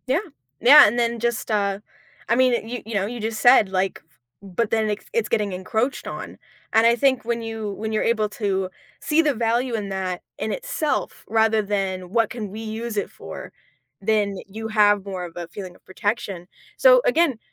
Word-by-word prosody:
Yeah. 265 Hz, +5 st, +2 dB, 0.4 s
Yeah, 270 Hz, +1 st, +9 dB
and 235 Hz, +4 st, 0 dB
then 235 Hz, 0 st, 0 dB
just, 235 Hz, -1 st, -2 dB
uh, 200 Hz, -2 st, 0 dB, 0.5 s
I 230 Hz, -, +4 dB
mean, 255 Hz, 0 st, +4 dB
uh, 225 Hz, -, -4 dB
you 245 Hz, +1 st, -5 dB
you 225 Hz, -, -7 dB
know, 195 Hz, -1 st, +1 dB
you 240 Hz, +3 st, -5 dB
just 220 Hz, 0 st, -3 dB
said 245 Hz, -5 st, +6 dB
like, 190 Hz, 0 st, -1 dB
f -, -, -37 dB, 0.4 s
but 230 Hz, +1 st, +1 dB
then 220 Hz, -1 st, +1 dB
it's 210 Hz, 0 st, -4 dB
it's 460 Hz, -1 st, 0 dB
getting 205 Hz, -3 st, 0 dB
encroached 220 Hz, +8 st, -2 dB
on. -, -, -7 dB, 0.4 s
And 225 Hz, +1 st, +5 dB
I 235 Hz, -, +5 dB
think 260 Hz, -2 st, +2 dB
when 235 Hz, 0 st, -1 dB
you 225 Hz, -2 st, -4 dB
when 220 Hz, +2 st, -4 dB
you're 215 Hz, -, 0 dB
able 220 Hz, -2 st, +1 dB
to 195 Hz, -3 st, -2 dB, 0.3 s
see 310 Hz, +1 st, +2 dB
the 300 Hz, -3 st, +1 dB
value 235 Hz, +2 st, 0 dB
in 205 Hz, -3 st, -3 dB
that 185 Hz, -2 st, -3 dB, 0.2 s
in -, -, -3 dB
itself, 410 Hz, -11 st, -3 dB
rather 220 Hz, -1 st, +3 dB
than 190 Hz, -3 st, -3 dB
what 230 Hz, +1 st, +2 dB
can 220 Hz, -4 st, -5 dB
we 215 Hz, -, -7 dB
use 225 Hz, +1 st, -5 dB
it -, -, -1 dB
for, -, -, -9 dB, 0.5 s
then 205 Hz, -1 st, +1 dB
you 220 Hz, +3 st, -6 dB
have 205 Hz, -2 st, +4 dB
more 185 Hz, -2 st, -4 dB
of 170 Hz, -, -10 dB
a 175 Hz, -1 st, -5 dB
feeling 185 Hz, -1 st, -9 dB
of -, -, -23 dB
protection. 195 Hz, -3 st, -3 dB, 0.3 s
So -, -, +7 dB
again, 335 Hz, -, +2 dB
220 Hz, 200 wpm, -23 LUFS, 200-235 Hz, 0.5 s, Yeah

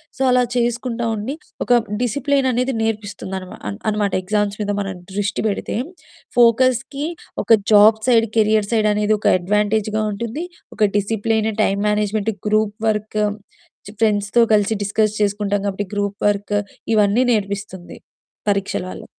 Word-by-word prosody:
So -, -, -8 dB
అలా 250 Hz, 0 st, +4 dB
చేసుకుంటా 240 Hz, 0 st, -1 dB
ఉండి 215 Hz, +6 st, -4 dB, 0.3 s
ఒక 245 Hz, -, +2 dB, 0.3 s
డిసిప్లిన్ 275 Hz, +3 st, +1 dB
అనేది 250 Hz, +2 st, 0 dB
నేర్పిస్తుందనమా 205 Hz, -4 st, -4 dB
అన్ 100 Hz, -, -4 dB
అన్నమాట. 210 Hz, -2 st, 0 dB
ఎగ్జామ్స్ 205 Hz, +1 st, -1 dB
మీద 205 Hz, 0 st, -1 dB
మనం 195 Hz, -2 st, -3 dB, 0.2 s
దృష్టి 205 Hz, +2 st, -2 dB
పెడితే 205 Hz, -, -3 dB, 0.6 s
ఫోకస్‌కి 255 Hz, +4 st, +3 dB, 0.4 s
ఒక -, -, -3 dB, 0.2 s
జాబ్ 215 Hz, +1 st, +7 dB
సైడ్‌, 230 Hz, -2 st, +4 dB
కెరియర్ 215 Hz, -1 st, +3 dB
సైడ్‌ 215 Hz, -2 st, +2 dB
అనేది 210 Hz, +1 st, +2 dB
ఒక -, -, -1 dB
అడ్వాంటేజ్‌గా 210 Hz, +3 st, 0 dB
ఉంటుంది. 235 Hz, +11 st, -4 dB, 0.3 s
ఒక -, -, -10 dB, 0.2 s
discipline, 220 Hz, +1 st, 0 dB
time 200 Hz, 0 st, 0 dB
management, 210 Hz, +1 st, 0 dB, 0.2 s
group 215 Hz, 0 st, +1 dB
work, 215 Hz, 0 st, -1 dB, 0.7 s
చ్ -, -, -8 dB
ఫ్రెండ్స్‌తో 210 Hz, +1 st, +2 dB
కలిసి 210 Hz, +1 st, +2 dB
డిస్కస్ 215 Hz, +1 st, 0 dB
చేసుకుంటాం 205 Hz, 0 st, 0 dB
కాబట్టి 200 Hz, 0 st, -3 dB
గ్రూప్ 205 Hz, 0 st, -2 dB
వర్క్ 205 Hz, 0 st, -2 dB, 0.4 s
ఇవన్నీ 210 Hz, +4 st, +3 dB
నేర్పిస్తుంది 200 Hz, -3 st, -4 dB, 0.5 s
పరీక్షల 200 Hz, -2 st, -1 dB
వల్ల. -, -, -9 dB
210 Hz, 135 wpm, -20 LUFS, 205-225 Hz, 0.7 s, జాబ్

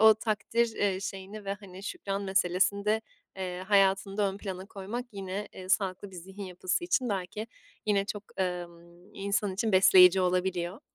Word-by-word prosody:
o 220 Hz, 0 st, +9 dB
takdir, 225 Hz, +1 st, 0 dB
eee, 195 Hz, -2 st, +1 dB
şeyini 200 Hz, +2 st, -6 dB
ve, 195 Hz, 0 st, -2 dB
hani, 195 Hz, -2 st, -12 dB
şükran 200 Hz, -, -3 dB
meselesini 190 Hz, +1 st, +2 dB
de, 215 Hz, +1 st, +2 dB, 0.4 s
eee, 185 Hz, -1 st, -4 dB
hayatında 195 Hz, 0 st, +3 dB
ön -, -, -8 dB
plana 190 Hz, -2 st, -6 dB
koymak 210 Hz, +5 st, -5 dB
yine, 195 Hz, +1 st, -5 dB
eee, 185 Hz, 0 st, -9 dB
sağlıklı 190 Hz, 0 st, 0 dB
bir 185 Hz, -, -11 dB
zihin 190 Hz, +3 st, -8 dB
yapısı 185 Hz, -, -2 dB
için 265 Hz, -8 st, +1 dB
belki 200 Hz, +2 st, -3 dB, 0.4 s
yine 200 Hz, -2 st, +3 dB
çok, 205 Hz, 0 st, -5 dB, 0.2 s
ımm, 175 Hz, +1 st, -5 dB
insan 200 Hz, 0 st, -1 dB
için 215 Hz, +1 st, 0 dB
besleyici 185 Hz, 0 st, +8 dB
olabiliyor. 180 Hz, +2 st, 0 dB
195 Hz, 160 wpm, -29 LUFS, 185-205 Hz, 0.4 s, o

